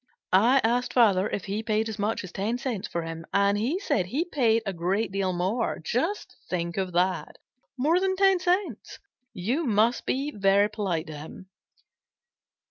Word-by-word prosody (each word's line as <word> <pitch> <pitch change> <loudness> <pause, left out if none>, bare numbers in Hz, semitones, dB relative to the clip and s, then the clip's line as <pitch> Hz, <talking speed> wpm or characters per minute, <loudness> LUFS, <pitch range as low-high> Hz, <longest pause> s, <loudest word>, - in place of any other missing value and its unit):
I 240 +8 +5
asked 245 +2 +1
Father 205 -6 +4
if 200 - -4
he 200 +2 -2
paid 220 0 0
as 220 -1 -6
much 210 +2 -1
as 185 - -8
ten 215 +7 -2
cents 240 -6 -3
for 170 - -3
him, 165 0 -6
and 200 0 +3
he 240 - 0
said 185 - 0
he 285 - -1
paid 235 -9 +2
a 195 - -2
great 190 +5 -1
deal 195 -1 0
more. 190 +7 -1
Just 295 - -2
think 170 -1 -2
of 190 -2 -2
that! 180 +2 0 0.4
More 310 +7 +3
than 380 0 0
ten 385 -1 +4
cents! 355 - -1 0.3
You 240 - -1
must 225 +2 +2
be 275 +3 -1
very 200 +1 +3
polite 190 -7 -2
to 155 - -8
him." 185 +5 -11
215 Hz, 175 wpm, -26 LUFS, 185-250 Hz, 0.4 s, I